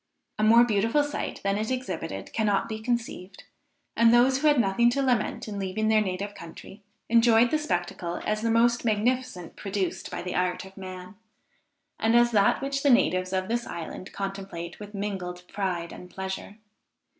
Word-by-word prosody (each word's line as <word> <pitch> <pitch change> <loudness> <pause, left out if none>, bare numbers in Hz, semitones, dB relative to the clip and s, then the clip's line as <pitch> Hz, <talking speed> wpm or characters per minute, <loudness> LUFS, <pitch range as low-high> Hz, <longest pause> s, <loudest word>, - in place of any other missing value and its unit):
A - - +1
more 230 +2 +7
beautiful 230 +5 +2
sight 290 0 -4
than 200 +1 0
it 220 - -2
exhibited 185 - -4
cannot 210 -3 +1
be 220 -1 -5
conceived; 225 -5 -4 0.5
and 230 0 +5
those 255 +3 +4
who 305 - +2
had 295 -3 +5
nothing 230 +2 +3
to 275 +3 0
lament 245 -5 0
in 205 -2 -5
leaving 200 +3 -1
their 215 -1 +4
native 200 +1 -3
country, 180 +3 -11 0.3
enjoyed 230 0 +5
the 310 - +2
spectacle 175 - -3
as 215 0 0
the 230 - 0
most 235 +1 +3
magnificent 230 -3 -1
produced 195 -2 -3
by - - -5
the 180 - -4
art 180 0 -1
of 190 0 -14
man, 185 0 -9 0.8
and 225 +1 +2
as 240 0 +5
that 205 +4 +3
which 275 0 -1
the 285 - +3
natives 185 -9 +3
of 185 0 -1
this 235 +1 -2
island 170 +2 -7
contemplate 195 -3 -6
with 210 0 -9
mingled 185 -3 -4
pride 180 -4 -3
and 180 - -11
pleasure. 190 +2 -6
210 Hz, 175 wpm, -27 LUFS, 185-235 Hz, 0.8 s, more